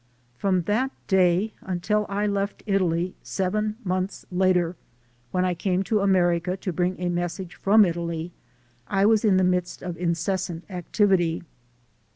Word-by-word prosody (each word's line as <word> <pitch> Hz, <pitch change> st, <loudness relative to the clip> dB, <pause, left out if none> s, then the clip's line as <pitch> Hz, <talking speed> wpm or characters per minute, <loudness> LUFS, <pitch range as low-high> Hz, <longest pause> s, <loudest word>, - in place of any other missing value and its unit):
From 185 Hz, +4 st, +1 dB
that 225 Hz, +9 st, +1 dB, 0.2 s
day 190 Hz, +2 st, +3 dB
until 200 Hz, +4 st, -1 dB
I 200 Hz, +1 st, 0 dB
left 200 Hz, 0 st, -2 dB
Italy, 180 Hz, -3 st, +1 dB
seven 210 Hz, +3 st, -1 dB
months 185 Hz, 0 st, -2 dB
later, 180 Hz, -1 st, +2 dB, 0.5 s
when 185 Hz, +5 st, 0 dB
I 180 Hz, -, +1 dB
came 180 Hz, +2 st, 0 dB
to 210 Hz, +3 st, +1 dB
America 180 Hz, -2 st, +2 dB
to 185 Hz, -1 st, -4 dB
bring 180 Hz, +1 st, -1 dB
a 180 Hz, -, -1 dB
message 175 Hz, +1 st, -3 dB
from 210 Hz, +2 st, +5 dB
Italy, 170 Hz, -1 st, -3 dB, 0.6 s
I 195 Hz, 0 st, +2 dB
was 220 Hz, 0 st, +4 dB
in 200 Hz, -4 st, +4 dB
the 185 Hz, -, +3 dB
midst 180 Hz, -1 st, 0 dB
of 175 Hz, -2 st, -4 dB
incessant 170 Hz, 0 st, -1 dB
activity. 180 Hz, -2 st, +1 dB
185 Hz, 145 wpm, -25 LUFS, 175-200 Hz, 0.6 s, from